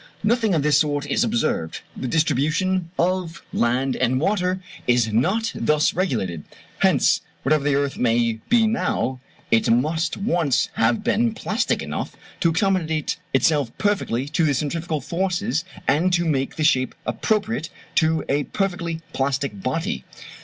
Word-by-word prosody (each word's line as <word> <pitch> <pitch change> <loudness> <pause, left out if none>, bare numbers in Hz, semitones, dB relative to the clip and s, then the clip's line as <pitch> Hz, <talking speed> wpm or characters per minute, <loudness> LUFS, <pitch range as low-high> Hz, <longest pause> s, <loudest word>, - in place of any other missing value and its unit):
Nothing 220 -3 +2
of 150 - +1
this 150 -1 +4
sort 145 -1 0
is 145 - +1
observed: 230 - -1
the 130 - -4
distribution 165 +5 +1
of 175 -1 -1
land 125 +3 +1
and 130 +2 +1
water 185 +2 0 0.3
is 120 -3 +2
not 195 - +1
thus 150 0 +2
regulated. 110 - -1 0.4
Hence, - - +3 0.2
whatever 150 +1 +2
the 145 -1 +2
earth 140 0 0
may 115 -1 +2
be 235 -2 +5
now, 175 - 0 0.3
it 115 - +3
must 155 +8 +1
once 170 - +1
have 115 +1 +1
been 230 0 +1
plastic 215 +2 -1
enough - - -4 0.2
to 170 - +3
accommodate 165 -3 0
itself 145 -9 +2
perfectly 165 - 0
to 160 +3 +1
the 145 -3 +2
centrifugal 155 +2 -2
forces, 185 - -1 0.2
and 175 +5 +3
to 170 -2 +2
take 135 0 -2
the 155 - -2
shape 130 -5 +2
appropriate 215 -5 -1 0.2
to 160 0 +2
a 145 +1 +1
perfectly 175 -4 -2
plastic 135 -6 -1
body. 165 - -2
160 Hz, 145 wpm, -23 LUFS, 135-185 Hz, 0.4 s, be